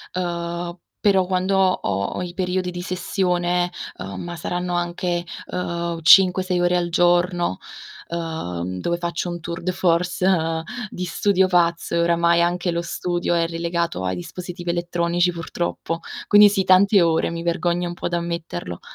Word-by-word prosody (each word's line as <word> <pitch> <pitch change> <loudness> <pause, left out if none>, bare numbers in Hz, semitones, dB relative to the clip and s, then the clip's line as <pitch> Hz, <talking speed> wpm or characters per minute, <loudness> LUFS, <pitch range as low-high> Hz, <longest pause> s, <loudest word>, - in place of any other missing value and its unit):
uhm, 175 0 -3 0.2
però 195 -3 +3
quando 185 +1 0
ho 140 - +1
ho - - -4
i 175 -1 -5
periodi 185 0 -1
di 175 0 -5
sessione 180 -1 0 0.3
uhm, 95 0 -6
ma 175 0 -6
saranno 175 +2 -3
anche, 175 0 -1 0.3
uhm, 170 -2 -3
5-6 185 +1 +5
ore 175 0 +2
al 175 -1 0
giorno, 175 - +2 0.5
uhm, 95 - -4
dove 170 0 -1
faccio 175 +1 -3
un 175 - -5
tour 170 0 -6
de 185 - 0
force 180 +1 +1 0.6
di 180 -1 -5
studio 190 +2 +2
pazzo, 170 -2 +1
e - - +2
oramai 170 0 +3
anche 175 +1 0
lo 170 0 -1
studio 175 0 -1
è 165 0 +2
relegato 170 - -2
ai 90 0 -1
dispositivi 175 - -5
elettronici, 175 0 0
purtroppo. 165 0 -4 0.3
Quindi, 205 0 +8
sì, 195 -2 0
tante 195 +1 +5
ore, 165 -1 +2
mi 170 0 -5
vergogno 175 0 0
un 175 - -4
po' 175 - -4
da 175 - 0
ammetterlo. 170 - -5
175 Hz, 155 wpm, -22 LUFS, 170-180 Hz, 0.6 s, Quindi